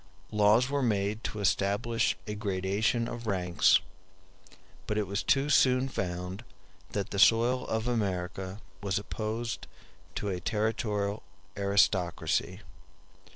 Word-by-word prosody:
Laws 105 +3 +4
were 140 0 -1
made 105 -2 0
to 105 - -4
establish 100 +4 +1
a 105 - -4
gradation 105 +4 0
of 120 -1 -6
ranks; 90 -3 +3 1.1
but 105 - -1
it 105 - +1
was 100 +2 -2
soon 135 -2 +4
found 90 0 -4 0.5
that 100 -2 -2
the 100 - -2
soil 120 +5 +4
of 110 +1 -1
America 95 -3 -2 0.2
was 100 -1 -1
opposed 110 +3 -4 0.5
to 105 - -3
a 90 -2 -2
territorial 105 0 -1 0.3
aristocracy. 100 -3 +1
105 Hz, 110 wpm, -29 LUFS, 100-115 Hz, 1.1 s, Laws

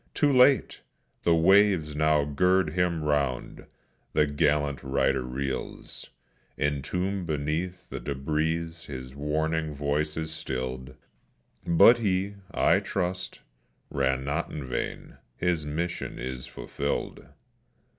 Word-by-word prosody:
Too 145 -2 +3
late! 130 +1 +4 0.4
the 85 - +4
waves 90 -3 +4
now 75 -1 +3
gird 90 +3 +2
him 85 -2 0
round; 70 -4 -1 0.5
the 75 - +4
gallant 70 -1 +1
rider 65 -1 +1
reels; 65 +1 -5 0.5
Entombed 90 +6 -1
beneath 80 +4 -2
the - - -4
debris 75 +3 -1 0.3
his 65 -2 -7
warning 80 +2 -1
voice 75 +2 -1
is 80 0 -3
stilled, 65 -4 -5 0.7
But 100 +8 +7
he, 100 -2 0 0.2
I - - +3
trust, 90 0 -3 0.5
ran 65 -1 +1
not 75 +4 -1
in 75 -3 -5
vain; 65 -1 -4 0.2
his 85 -4 0
mission 85 +4 -3
is 65 +1 -5
fulfilled. 70 0 -4
75 Hz, 110 wpm, -27 LUFS, 70-90 Hz, 0.7 s, But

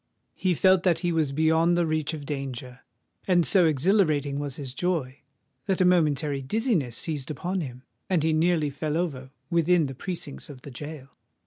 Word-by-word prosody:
He 185 -2 0
felt 190 +2 +4
that 180 -3 +2
he 175 - +2
was 160 -4 +1
beyond 160 +3 +3
the 175 - +2
reach 155 0 -1
of 145 -2 -8
danger; 135 -3 -5 0.5
and 175 -3 +4
so 180 -4 +5
exhilarating 150 -3 +2
was 145 -2 -4
his 135 -3 -6
joy, 145 -5 -2 0.5
that 190 - +1
a 185 - +4
momentary 150 -5 +2
dizziness 165 - 0
seized 150 -5 -3
upon 175 +6 -2
him—and 140 +5 -4
he 160 0 +2
nearly 160 -2 +2
fell 150 +2 -2
over 140 -7 -3 0.2
within 170 0 +3
the 135 - -5
precincts 135 - -6
of 130 -3 -11
the 140 - -9
gaol. 145 +1 -8
155 Hz, 175 wpm, -26 LUFS, 140-175 Hz, 0.5 s, so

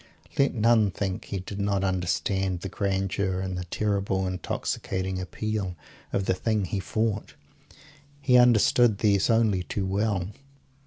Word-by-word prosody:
Let 140 -1 +3
none 110 -2 +4
think 95 +1 -3
he 100 -2 -4
did 100 +2 -7
not 100 -1 0
understand 95 0 0
the 95 - -4
grandeur, 95 -1 -1
and 95 -1 -3
the 90 0 -4
terrible 100 0 -1
intoxicating 95 +1 -3
appeal, 95 +1 -3 0.4
of 95 - 0
the - - +2
thing 105 +2 0
he 95 +2 -2
fought. 105 +4 -2 0.8
He 135 -3 +3
understood 120 -2 +5
these 100 -1 +2
only 110 -5 +3
too 95 +2 -3
well. 100 -1 -1
100 Hz, 140 wpm, -26 LUFS, 95-110 Hz, 0.8 s, understood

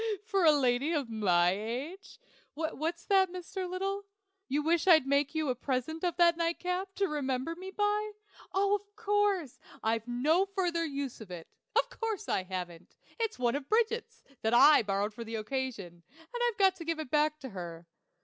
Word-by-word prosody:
for 395 -4 0
a 315 - +8
lady 270 +1 +2
of 280 -7 -1
my 180 -5 +3
age? 250 - -5 0.4
What's 325 +2 -3
that, 380 -2 +3
Mr. 365 +1 -5
Little? 390 +2 -2 0.5
You 290 +2 0
wish 335 +2 +2
I'd 315 -6 +7
make 280 +2 +1
you 310 -3 0
a - - +2
present 260 +6 -3
of 350 -2 0
that 340 -1 +5
nightcap, 360 +3 -2
to 395 - +1
remember 280 0 -2
me 375 +2 -8
by? 415 +1 0 0.4
Of 400 +1 +2 0.2
course; 410 - 0 0.2
I've 225 +1 0
no 305 +11 +2
further 345 -3 +1
use 280 -4 -4
for 215 -5 -10
it. 170 -2 -8 0.3
Of - - +2
course 440 -3 -2
I - - +1
haven't. 180 -2 -7 0.2
It's 450 -1 -1
one 240 -1 +1
of 285 -1 -5
Bridget's, 455 +1 0 0.2
that 220 +2 +2
I 295 +4 +8
borrowed 205 0 -1
for 235 - -7
the 225 0 -6
occasion, 215 -7 -4 0.2
and 480 +10 -8
I've 440 - -7
got 385 -2 +4
to 335 - -7
give 330 0 -1
it 310 -5 -6
back 300 0 +2
to 265 - -6
her. 175 -4 -7
310 Hz, 180 wpm, -31 LUFS, 245-375 Hz, 0.5 s, a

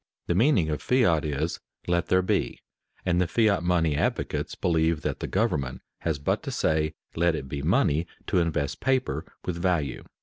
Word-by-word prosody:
_ - - -55 0.2
The - - 0
meaning 110 - +3
of 75 - -2
fiat 110 - +3
is 75 -3 -2 0.3
"let 85 -1 +1
there 95 0 +3
be," - - 0 0.5
and 90 -1 +2
the 90 - +1
fiat 105 -1 +2
money 85 -4 +2
advocates 75 - -1
believe 80 -2 +1
that - - -2
the - - -3
government 65 -2 -1 0.2
has 80 -3 -1
but 70 - 0
to - - -6
say, 80 0 0 0.2
"let 85 0 +2
it 65 -3 -5
be 70 +1 -4
money," 85 - +2 0.2
to - - +2
invest 80 -4 -1
paper 130 -1 0 0.2
with 90 -2 -2
value. 85 -7 0
85 Hz, 180 wpm, -26 LUFS, 75-90 Hz, 0.5 s, meaning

